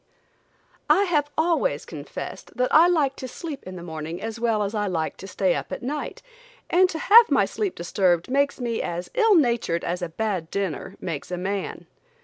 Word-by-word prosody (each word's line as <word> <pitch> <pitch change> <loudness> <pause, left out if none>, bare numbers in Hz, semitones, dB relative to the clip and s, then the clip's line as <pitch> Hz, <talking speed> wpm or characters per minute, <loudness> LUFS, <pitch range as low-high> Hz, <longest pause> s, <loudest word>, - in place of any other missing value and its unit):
I 395 - +5
have 300 -6 +1
always 340 +10 +1
confessed - - -8
that 250 0 +1
I 325 +3 +8
like 300 -6 +2
to 260 - -6
sleep 290 +2 -7
in 185 - -7
the 175 - -8
morning 160 0 -6
as 225 +2 -5
well 225 -3 +1
as 200 +1 -3
I 210 -1 -1
like 165 -4 -2
to 195 - -9
stay 185 -1 +1
up - - -4
at - - -5
night, 290 +4 -4 0.5
and 365 +1 +5
to 325 - -4
have 455 +7 +7
my - - +4
sleep 410 -4 -3
disturbed 175 0 +1
makes 280 +2 +1
me 235 -2 -2
as 175 +1 -4
ill 450 -4 +4
natured 235 - +2
as 180 +1 -2
a 175 - -3
bad 185 -3 -2
dinner 195 -1 -3
makes 160 -5 -5
a 180 - -3
man. 195 +2 -3
225 Hz, 195 wpm, -24 LUFS, 180-305 Hz, 0.5 s, I